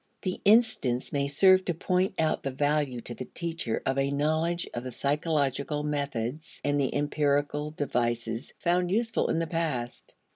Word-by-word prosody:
The 185 -1 -3
instance 205 - +3
may 140 -1 +1
serve 185 +6 +5
to 175 - -1
point 185 +3 0
out 160 -1 +1
the 135 - -2
value 145 -2 0
to 120 - -6
the 130 - -6
teacher 165 -9 -3
of 135 +1 +1
a 135 0 +1
knowledge 155 +4 0
of 120 - -4
the 130 - -5
psychological 145 +1 0
methods 140 -1 -3
and 145 0 +1
the 135 - -1
empirical 145 0 0
devices 120 -4 -2
found 175 0 +1
useful 225 +4 +1
in - - +1
the 165 - 0
past. 155 -7 -3
145 Hz, 160 wpm, -28 LUFS, 135-165 Hz, -, serve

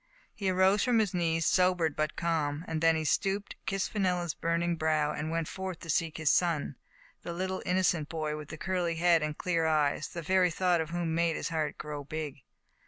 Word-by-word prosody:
He 200 -4 -2
arose 190 +2 +3
from 245 -2 +3
his 210 -4 +1
knees, 165 -2 +1
sobered 180 -4 +2
but 155 0 -1
calm. 160 -2 -1
Then 165 0 +2
he 160 - -1
stooped, 195 +5 0
kissed 195 0 -1
Fenella's 180 -5 0
burning 170 +1 0
brow, 155 -2 +1
and 155 +1 -3
went 165 -1 -1
forth 190 -2 -5
to 165 - -3
seek 160 +1 0
his 160 -2 +2
son 165 -6 +1 0.2
— - - -28
the 170 - -5
little, 185 +2 -3
inno 185 +1 +2
cent 155 -5 +1
boy, 155 -2 -2
with 150 -1 -8
the - - -7
curly 180 -4 -1
head 170 0 +4
and 150 0 -3
clear 165 -3 0
eyes, 150 -1 +1
the 170 - -7
very 185 +2 +3
thought 175 0 +1
of 160 - -4
whom 170 -1 -2
made 165 -1 +1
his - - -3
heart 160 -2 -2
grow 150 -1 -6
big. 145 -1 -5
165 Hz, 210 wpm, -30 LUFS, 155-180 Hz, 0.2 s, head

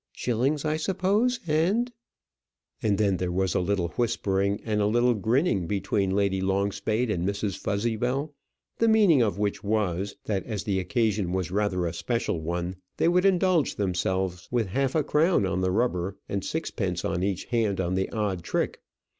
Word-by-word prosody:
Shillings, 130 +5 0
I 155 0 +1
suppose, 200 +8 +1
and 180 +11 +1 0.4
" 60 -2 -51
and 105 -2 +1
then 100 -3 +2
there 90 -1 -2
was 95 -1 0
a - - +2
little 90 -1 0
whispering 100 -2 0
and 105 -2 0
a 100 - +3
little 120 +3 +3
grinning 110 - +1
between 100 0 0
Lady 95 -1 +1
Longspade 100 +4 0
and 85 -4 -1
Mrs. 100 0 -1
Fuzzybell, 120 +8 -1 0.5
the 230 - +4
meaning 205 - +5
of 105 -5 +1
which 105 -1 -1
was, 100 -2 -1
that 100 -4 -1
as 105 -3 -3
the 100 -2 0
occasion 100 -1 0
was 95 -2 -2
rather 95 -3 0
a 85 - -2
special 85 +1 -2
one, 85 +3 -3 0.2
they 165 - +3
would 180 +2 +3
indulge 185 -5 +3
themselves 95 -2 -1
with 120 -2 +1
half 135 - 0
a 155 - +3
crown 150 - +3
on 95 -1 -1
the 95 - +1
rubber 95 -3 0
and 100 -1 -2
sixpence 95 - -2
each 95 +1 -1
hand 110 -5 0
on 90 -1 0
the 95 +1 0
odd 105 -5 -2
trick. - - -2
100 Hz, 170 wpm, -26 LUFS, 95-125 Hz, 0.5 s, meaning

